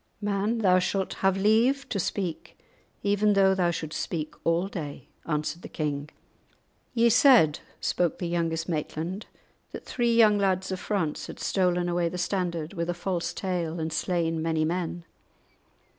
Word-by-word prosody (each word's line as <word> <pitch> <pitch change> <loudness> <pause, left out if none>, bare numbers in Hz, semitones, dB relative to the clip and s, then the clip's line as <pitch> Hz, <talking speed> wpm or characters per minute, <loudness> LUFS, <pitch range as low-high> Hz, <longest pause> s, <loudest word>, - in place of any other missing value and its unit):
"Man, 205 +2 0
thou 185 -4 +4
shalt 190 +1 -1
have 195 0 +3
leave 230 +7 +3
to 200 - -1
speak, 180 -2 -3 0.5
even 205 +1 +3
though 195 -1 +5
thou 180 -2 +2
shouldst 155 -2 -3
speak 155 -3 -4
all 170 +3 +1
day," 150 -9 -7 0.2
answered 155 +1 -2
the - - -9
king. 145 -1 -3 0.9
"Ye 235 0 +5
said," 235 - +6 0.2
spoke 175 -3 0
the 175 - -3
youngest 165 -1 -1
Maitland, 165 +4 -3 0.5
"that - - -8
three 240 -2 +1
young 215 -3 +6
lads 190 -1 0
of 185 - -3
France 180 -8 -2
had - - -9
stolen 180 -2 +1
away 175 -1 +1
the 180 - -6
standard 175 -3 -2
with 170 -2 -3
a 175 - -1
false 175 -1 -2
tale, 175 -3 -3
and 160 0 -3
slain 165 -2 0
many 160 -1 +1
men. 175 0 -3
180 Hz, 160 wpm, -27 LUFS, 165-200 Hz, 0.9 s, said